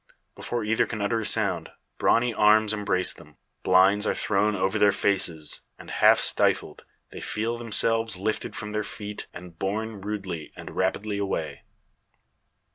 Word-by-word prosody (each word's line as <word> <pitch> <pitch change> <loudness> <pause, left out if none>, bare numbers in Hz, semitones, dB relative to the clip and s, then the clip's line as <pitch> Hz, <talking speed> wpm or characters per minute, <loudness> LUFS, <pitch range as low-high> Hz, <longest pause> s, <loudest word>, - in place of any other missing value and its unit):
Before 120 -2 -3
either 110 +1 +1
can 110 - -5
utter 105 +3 0
a 110 - -4
second, - - 0 0.3
brawny 120 0 +3
arms 110 0 +4
embrace 90 -3 0
them; - - -17 0.2
blinds 95 +3 +4
are - - +1
thrown 105 0 +1
over 95 +3 0
their 105 -1 +5
faces; 85 -6 -1 0.2
and, - - -11
half - - +5
stifled, - - +1 0.3
they - - -8
feel 115 +2 -3
themselves 115 -2 +2
lifted 110 +4 -3
from 105 -1 -5
their 105 0 -1
feet, 105 0 -7
and 85 -2 -12
borne 105 +1 -3
rudely 95 -6 -5
and - - -9
rapidly 100 +2 -1
away! 80 -7 -3
105 Hz, 150 wpm, -26 LUFS, 95-110 Hz, 0.3 s, their